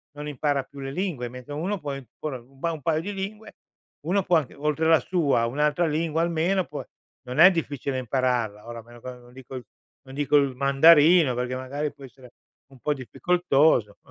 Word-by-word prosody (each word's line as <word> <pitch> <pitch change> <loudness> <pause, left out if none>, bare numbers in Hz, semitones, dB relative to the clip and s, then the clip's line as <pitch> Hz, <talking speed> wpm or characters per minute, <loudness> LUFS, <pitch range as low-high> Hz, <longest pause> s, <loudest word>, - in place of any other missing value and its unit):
non 150 0 -7
impara 145 0 -1
più 140 - -14
le 135 0 -5
lingue, 165 -7 -3
mente 125 +3 -11
uno 180 +8 -2
può 145 -3 -5
ancora 135 +1 -7
un 130 +3 -22
ba 170 +4 -1
un 160 -2 -7
paio 155 +3 0
di 205 +4 -5
lingue, 205 +3 -7 0.5
uno 190 +3 +1
può 175 -3 +3
anche 145 -5 -3
oltre 150 +2 -1
la 160 -1 +6
sua, 145 -10 +1
un'altra 150 +7 +1
lingua, 160 +1 -1
almeno 170 +3 +1
può 145 -4 -7 0.4
non 125 +3 -5
è 180 +3 +9
difficile 145 -5 -3
impararla. 120 -4 -1
Ora 120 0 -7
a - - -9
meno 120 +1 -16
che 130 - -7
non 125 0 -15
dico 130 0 -9 0.4
non 135 0 -13
dico 145 +1 0
il 140 -2 +1
mandarino 145 +3 +5
perché, 125 +1 -2
magari, 140 +3 -4
può 140 - -16
essere 130 -1 -16 0.4
un 135 - -17
po' 150 - 0
difficoltoso. 140 - +1
145 Hz, 195 wpm, -25 LUFS, 130-165 Hz, 0.5 s, è